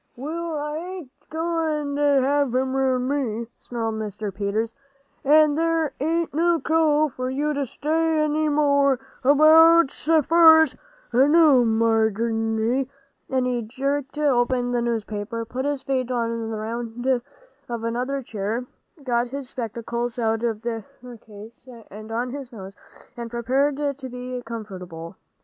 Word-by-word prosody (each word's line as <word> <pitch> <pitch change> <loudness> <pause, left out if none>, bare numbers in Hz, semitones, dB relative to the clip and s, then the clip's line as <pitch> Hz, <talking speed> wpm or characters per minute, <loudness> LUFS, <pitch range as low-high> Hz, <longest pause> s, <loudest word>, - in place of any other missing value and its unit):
"Well, 320 +5 -4
I 295 +1 -3
ain't 355 -4 -7
a - - -34
goin' 320 -3 -1
to - - -1 0.2
have 280 -2 +1
'em 260 +1 0
round 260 -1 +1
me," 245 -5 -2
snarled 225 -2 -4
Mr. 210 -1 -5
Peters. 210 +3 -2 0.5
"An' 300 +1 +5
there 325 -1 0
ain't 325 +3 -1
no 335 +2 +2
call 310 -2 +2
for 255 -1 -4
you 295 +3 -1
to 280 -2 -2
say 320 +4 0
any 305 0 +1
more 280 -3 +3 0.2
about's 315 +2 +5 0.2
fur's 320 -3 +6 0.4
I 260 +4 +5
know, 300 -5 +6
Marindy," 225 +2 +1 0.4
and 260 -1 0
he 245 -1 -1
jerked 275 +5 -3
open 250 -4 +1
the 240 -1 0
newspaper, 230 -1 -3
put 255 +4 -4
his 285 -2 -2
feet 260 -2 -1
on 230 -2 -2
the 220 - -4
round 230 +2 -5 0.6
of 235 -1 -4
another 250 +4 -2
chair, 220 +2 -3 0.4
got 240 -2 0
his 270 0 -6
spectacles 235 0 -4
out 225 -1 0
of 225 -1 -2
their 230 -2 -3 0.4
case 220 +4 -13 0.2
and 215 +2 -10
on 240 +2 -2
his 275 -2 -7
nose, 195 -3 -10 0.4
and 235 -1 -6
prepared 260 +5 0 0.2
to 260 -2 -7
be 250 0 -6
comfortable. 185 -7 -8
255 Hz, 140 wpm, -23 LUFS, 230-295 Hz, 0.6 s, fur's